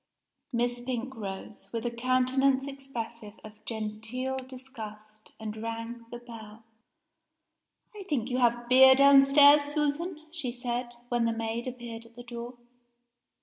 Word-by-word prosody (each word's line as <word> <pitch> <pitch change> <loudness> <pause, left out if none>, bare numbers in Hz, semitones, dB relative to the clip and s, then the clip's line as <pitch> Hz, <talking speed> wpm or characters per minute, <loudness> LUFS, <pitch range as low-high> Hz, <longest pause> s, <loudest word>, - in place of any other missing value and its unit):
Miss 240 0 0
Pink 255 +1 -4
rose, 200 -1 -7
with 230 -1 -4
a 240 - 0
countenance 255 +2 +2
expressive 235 -6 -7
of 215 0 -13
genteel 225 +4 -4
disgust, 220 -5 -10
and 215 -1 -5
rang 230 +1 -6
the 240 - -7
bell. 225 -2 -12 1.3
"I 415 - -8
think 255 -4 -1
you 250 - 0
have 240 -1 +2
beer 260 +1 +8
downstairs, 280 +1 +7
Susan?" 300 +3 -1
she 300 -7 -3
said, 240 0 -4
when 240 -1 +1
the 230 - +1
maid 225 +2 -3
appeared 235 -2 -7
at 230 - -22
the 245 - -10
door. 240 +1 -7
240 Hz, 135 wpm, -29 LUFS, 230-265 Hz, 1.3 s, beer